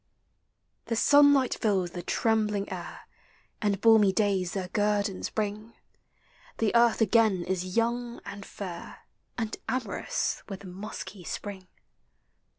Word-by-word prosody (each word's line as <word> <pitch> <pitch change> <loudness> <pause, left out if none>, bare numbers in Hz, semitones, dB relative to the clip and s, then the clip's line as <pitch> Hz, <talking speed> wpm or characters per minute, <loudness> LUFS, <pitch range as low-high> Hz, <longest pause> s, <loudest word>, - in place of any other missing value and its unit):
The 230 - -2
sunlight 285 +1 +5
fills 190 -5 0
the 175 - -5
trembling 210 +1 0
air, - - -7 0.6
And 205 -3 +1
balmy 220 -2 +6
days 190 -3 0
their 185 -2 -3
guerdons 205 -1 0
bring; 215 +1 -4 0.8
The 220 -2 +1
Earth 235 -1 +4
again 215 -4 +3
is 185 +2 -3
young 235 +1 0
and 200 0 -7
fair, 180 -4 -8 0.3
And 225 -2 -2
amorous 250 -6 -2
with 195 0 -7
musky 190 0 -8
Spring. 190 +1 -6
205 Hz, 115 wpm, -28 LUFS, 190-225 Hz, 0.8 s, balmy